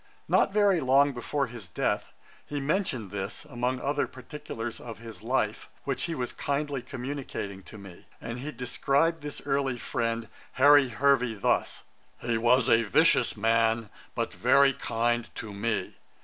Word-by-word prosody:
Not - - +3
very 200 -3 +4
long 140 +1 +4
before 135 +3 -2
his 115 -6 -10
death, 80 - -1 0.3
he 145 - -4
mentioned 135 - -1
this, 100 +6 -4
among 125 -2 -2
other 145 +2 0
particulars 125 -3 -7
of 115 -3 -8
his 115 -1 -10
life, 115 -2 -1
which 135 -2 -2
he 165 - -3
was 125 -4 -3
kindly 140 -1 -2
communicating 125 -7 -5
to 110 - -11
me; 95 -3 -13
and 115 +1 -6
he 145 +4 -5
described 145 +6 0
this 145 0 -6
early 135 -3 0
friend, 115 -1 -2 0.3
'Harry 145 0 +6
Hervey,' 125 -1 +2
thus: 100 - 0 0.3
'He 120 -1 -1
was 120 +2 +4
a 115 - +5
vicious 110 - +3
man, 115 0 +2 0.2
but - - -2
very 140 0 +4
kind 120 -2 -1
to 110 -2 -6
me. 110 +3 -2
125 Hz, 150 wpm, -28 LUFS, 115-140 Hz, 0.3 s, Harry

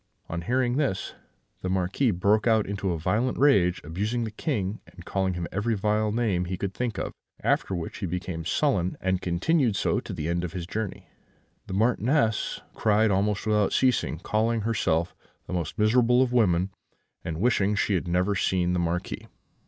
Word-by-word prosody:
On 85 0 -3
hearing 125 +6 +1
this, 135 -11 -1 0.5
the 95 - -2
Marquis 95 +8 +1
broke 105 +4 +2
out 110 -2 +4
into 100 -1 -2
a 85 - -1
violent 105 +11 0
rage, 100 -11 +4
abusing 105 +10 -2
the 110 - -4
King, 105 - -2
and 90 -1 -14
calling 95 -2 -1
him 85 -1 -3
every 110 +4 0
vile 105 +1 +1
name 105 -6 0
he 90 +1 -3
could 100 0 -3
think 120 +1 -3
of; - - -3 0.3
after 95 - +1
which 85 +5 -5
he 100 - -2
became 85 -1 -4
sullen, 95 - +1
and 95 0 0
continued 110 - +1
so - - +1
to - - -8
the 80 -2 -3
end 85 +1 0
of 90 - -4
his 90 -2 -4
journey. 105 +2 -5 0.6
The 95 - -4
Marchioness 115 +1 +1
cried 110 0 +3
almost 100 +1 +1
without 105 -2 +2
ceasing, 130 -11 +2
calling 110 +5 0
herself 90 -6 0 0.3
the 90 - -7
most 85 +1 -3
miserable 120 +3 +4
of 125 -1 -2
women, 95 -5 +3 0.5
and 80 -1 -4
wishing 105 -2 +2
she 100 - +1
had 90 -1 0
never 90 +4 +1
seen 90 -1 +1
the 90 - +1
Marquis. 85 +1 -2
100 Hz, 180 wpm, -26 LUFS, 90-115 Hz, 0.6 s, out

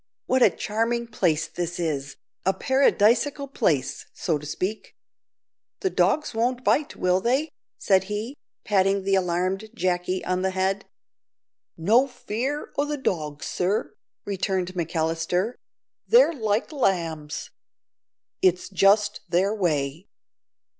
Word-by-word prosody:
"What 260 0 +2
a - - +8
charming 230 +2 -1
place 170 -8 0
this 175 0 -4
is, 145 -4 -2 0.3
a 190 +1 +1
paradisaical 270 +1 +2
place, 135 - 0
so 160 -5 -1
to 150 - -9
speak. 185 +8 -4 0.9
The 380 - 0
dogs 305 -4 +1
won't 245 +3 0
bite, 295 +2 +1
will 180 +1 +1
they?" 265 +8 +1 0.3
said 190 -1 +3
he, 210 +6 -4 0.3
patting 195 -1 +2
the 195 0 0
alarmed 185 +3 0
Jacky 180 -1 -1
on 185 0 0
the 190 - +1
head. 190 +1 -1 0.9
"No 225 +11 +4
fear 265 +4 -4
o' 285 - +3
the 295 0 -3
dogs, 155 - -2
sir," 190 +4 -1 0.3
returned 190 -2 -1
McAllister; 165 +4 -1 0.5
"they're 475 -7 +6
like 220 -3 -1
lambs. 165 - -1 0.9
It's 180 -1 +2
just 205 +2 +3
their 185 +4 +2
way. 160 -4 -1
195 Hz, 120 wpm, -25 LUFS, 175-230 Hz, 0.9 s, a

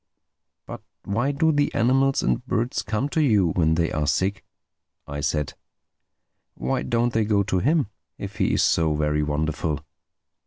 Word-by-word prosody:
"But - - -8 0.2
why 120 +8 0
do 160 +3 +2
the 145 -1 +1
animals 135 +3 +2
and - - 0
birds 120 0 -1
come 110 +6 -2
to 160 - +1
you 105 - +3
when 80 -2 +2
they 85 0 0
are 75 -1 -1
sick?" 95 +7 0 0.6
I 70 0 -6
said—"Why 80 - -6
don't 120 0 0
they 110 - +2
go 105 -1 +2
to 95 -2 0
him, 150 - +2 0.3
if - - -7
he - - +1
is - - +2
so 80 -2 +2
very 75 0 0
wonderful?" 75 +1 -2
100 Hz, 155 wpm, -24 LUFS, 80-130 Hz, 0.6 s, you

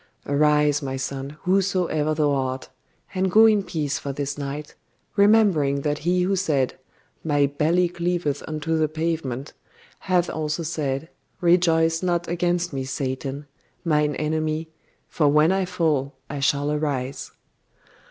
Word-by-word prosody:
Arise, 150 0 +3
my 135 -1 -3
son, 135 +2 -5
whoso 190 0 +2
ever 155 -1 0
thou 150 -2 +2
art; 130 -1 -2 0.4
and 190 0 +1
go 220 +4 +7
in 215 -2 +5
peace 150 -6 -2
for 140 - -4
this 140 0 -3
night, 145 +1 -6 0.4
remembering 200 -10 +4
that 145 0 -1
he 180 +3 +1
who 195 +2 +1
said, 150 -9 +1 0.5
"My 145 -3 +2
belly 155 +6 +2
cleaveth 170 -4 -2
unto 155 +1 -1
the 155 - +3
pavement," 155 -4 -3 0.5
hath 180 -2 +1
also 155 +1 -2
said, 150 -2 -2 0.3
"Rejoice 165 -2 +3
not 175 -2 0
against 175 0 0
me, 135 -1 -2
Satan, 135 +1 -4 0.4
mine 150 -2 +2
enemy, 155 +1 -1 0.4
for 155 -4 +1
when 150 +3 +4
I 190 0 +1
fall 155 -7 0 0.2
I 145 - -4
shall 145 +1 +1
arise!" 140 -3 -2
155 Hz, 140 wpm, -24 LUFS, 140-175 Hz, 0.5 s, go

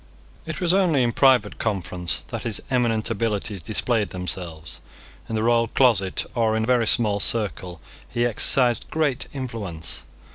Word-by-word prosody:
It - - -4
was 175 -2 +2
only 175 -9 +3
in 120 - +1
private 125 -4 +3
conference 90 -5 -2
that - - -4
his 115 -4 -1
eminent 115 -3 +1
abilities 105 -3 -2
displayed 110 +3 0
themselves. 85 -3 -4 0.5
In 115 - -2
the 110 - 0
royal 115 0 +3
closet, 110 -7 +2
or 110 -2 +1
in 110 - 0
a - - 0
very 120 -2 +2
small 105 -3 +3
circle, 95 -6 -1 0.3
he 120 0 0
exercised 120 +1 +2
great 145 -5 -1
influence. 105 - -5
115 Hz, 150 wpm, -23 LUFS, 100-125 Hz, 0.5 s, only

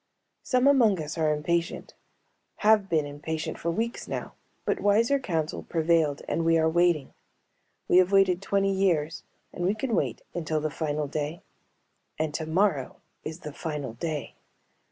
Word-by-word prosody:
Some 255 0 +1
among 240 -9 +5
us 155 +1 -4
are 155 -1 +3
impatient, 170 +3 -1 0.7
have 210 -2 +5
been 160 -4 +2
impatient 155 +2 -4
for 170 - -2
weeks 230 +8 -2
now, - - -5 0.3
but - - 0
wiser 230 +7 +3
counsel 165 - -2
prevailed 160 -3 +1
and 165 - 0
we 165 0 +4
are 160 0 +3
waiting. 170 -3 +2 0.7
We - - +5
have 185 +1 +5
waited 195 -2 +4
twenty 195 0 +1
years 170 -5 +1 0.3
and 175 - -4
we 190 +4 +2
can 235 +2 -2
wait 135 - -1
until 160 -2 -1
the 155 0 -2
final 150 -1 -2
day. 150 +3 -4 0.7
And 155 -1 -1
tomorrow 160 -2 0 0.3
is 160 +2 -6
the 150 - -7
final 150 -6 -4
day. 150 +4 -4
165 Hz, 155 wpm, -27 LUFS, 155-195 Hz, 0.7 s, among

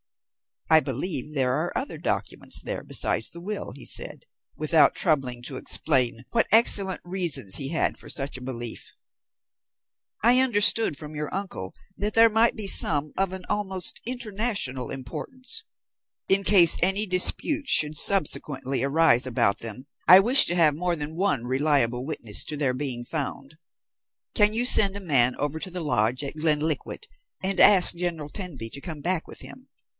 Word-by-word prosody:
"I 160 - +6
believe 150 +1 -3
there 130 -2 +1
are 155 +6 -3
other 270 - -5
documents - - -3
there - - -5
besides - - -1
the 170 - -11
will," 205 +3 -6
he 140 - -12
said, - - -2 0.3
without 155 0 +2
troubling 135 -8 0
to 130 +1 -4
explain 125 -7 0
what 230 - +1
excellent 200 -4 +2
reasons 170 - +1
he 135 -1 -2
had 165 - -1
for - - -12
such 135 -2 -4
a - - -12
belief. 120 -3 -6 1.3
"I 245 +3 +5
understood 220 - +2
from 155 -1 -9
your 150 0 -5
uncle 185 - -6 0.2
that 205 +2 -3
there 225 0 +6
might 225 +2 +2
be 215 -3 -5
some 150 -5 +4
of 190 -1 -1
an 190 -1 -7
almost 190 -3 0
international 210 - -3
importance. 255 - -5 0.6
In 195 +1 +4
case 185 -4 +5
any 195 +4 +1
dispute 275 - -2
should 155 - +3
subsequently 145 -8 -1
arise 140 -2 +2
about 105 -4 0
them, 115 +4 -6 0.2
I 185 +2 +9
wish 250 +7 +7
to 175 - +1
have 160 -4 +3
more 175 +3 -2
than 150 0 -7
one 185 - -1
reliable 130 -2 0
witness 115 -9 +1
to 150 - -4
their 140 -3 0
being 130 -2 -4
found. 140 +1 -6 0.8
Can 210 0 +3
you 235 +2 0
send 200 -5 +5
a - - -5
man 130 -8 +2
over 145 +2 -4
to 185 - -4
the 180 0 -6
lodge 125 -3 -1
at 140 +2 -6
Glenkliquart, 155 0 -1 0.4
and 190 0 -1
ask 190 -3 +6
General 170 -4 -5
Tenby 145 - -7
to 140 - -8
come 160 -3 -8
back 175 +1 -2
with - - -9
him. - - -12
160 Hz, 165 wpm, -24 LUFS, 135-195 Hz, 1.3 s, I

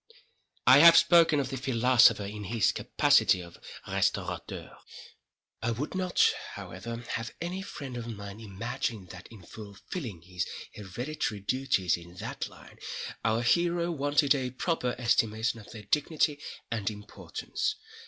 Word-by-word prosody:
I 130 +3 +8
have 165 +2 +9
spoken 165 -4 +6
of 135 -2 -1
the 135 - -3
philosopher 125 -4 +4
in 105 +1 -6
his 110 +1 +2
capacity 95 - +3
of 85 -1 -11 0.3
restaurateur. - - -2 0.9
I 115 - 0
would 120 +6 -3
not, 185 -1 +3 0.3
however, 115 +6 -7
have 115 -1 -4
any 175 +3 -4
friend 140 -9 -7
of 120 -1 -5
mine 100 -2 -7
imagine 110 0 -4
that, 90 +2 -11
in 110 -5 -13
fulfilling 105 - -8
his 90 -1 -4 0.3
hereditary 105 +2 -4
duties 100 -6 +1
in 85 +1 -13
that - - -5
line, - - -16 0.4
our 115 +1 +1
hero 170 +5 +2
wanted 145 -1 +3
a 130 -3 -2
proper 125 -1 -1
estimation 115 -1 +1
of 105 - -14
their 110 -2 -10
dignity 150 +4 +1 0.3
and 110 -3 -1
importance. 105 0 -4
115 Hz, 135 wpm, -29 LUFS, 105-145 Hz, 0.9 s, have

